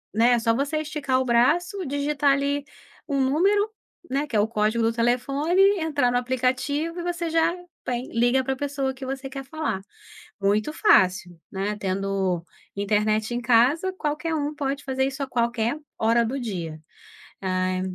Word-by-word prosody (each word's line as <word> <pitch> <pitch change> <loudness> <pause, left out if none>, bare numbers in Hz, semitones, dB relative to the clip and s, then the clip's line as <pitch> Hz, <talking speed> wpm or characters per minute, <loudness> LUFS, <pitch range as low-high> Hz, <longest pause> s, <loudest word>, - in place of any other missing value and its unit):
né, 235 +2 +4
só 230 0 +2
você 285 +4 -1
esticar 290 -4 -1
o 260 - 0
braço, 345 - +2
digitar 285 0 +1
ali 280 +1 0 0.5
um 275 -1 0
número, 390 +11 +2 0.4
né, 280 +3 -1
que 235 - -5
é - - +4
o 210 - +3
código 220 +1 0
do 225 - +2
telefone, 275 +9 +1 0.2
entrar 290 -6 +1
no 245 - +2
aplicativo 260 +6 -1
e - - -4
você 345 -1 -2
já 330 +1 +3 0.3
vai 245 0 -2
liga 245 +2 +1
pra 265 +1 -1
pessoa 275 -1 -2
que 265 0 -8
você 270 0 -4
quer 270 0 -7
falar. 295 -8 -3 0.6
Muito 210 +8 +1
fácil, 185 - +3
né, 200 +2 -2
tendo 190 -2 -1 0.3
internet 215 +3 0
em 240 - -1
casa 255 +10 +3
qualquer 320 -1 -2
um 295 -1 -1
pode 280 -1 -2
fazer 265 -1 0
isso 270 +1 -4
a 275 - -3
qualquer 235 +1 0 0.2
hora 230 +1 +3
do 265 +4 -3
dia. 170 -9 -5 0.6
Ah, 185 0 0
260 Hz, 165 wpm, -24 LUFS, 225-290 Hz, 0.6 s, né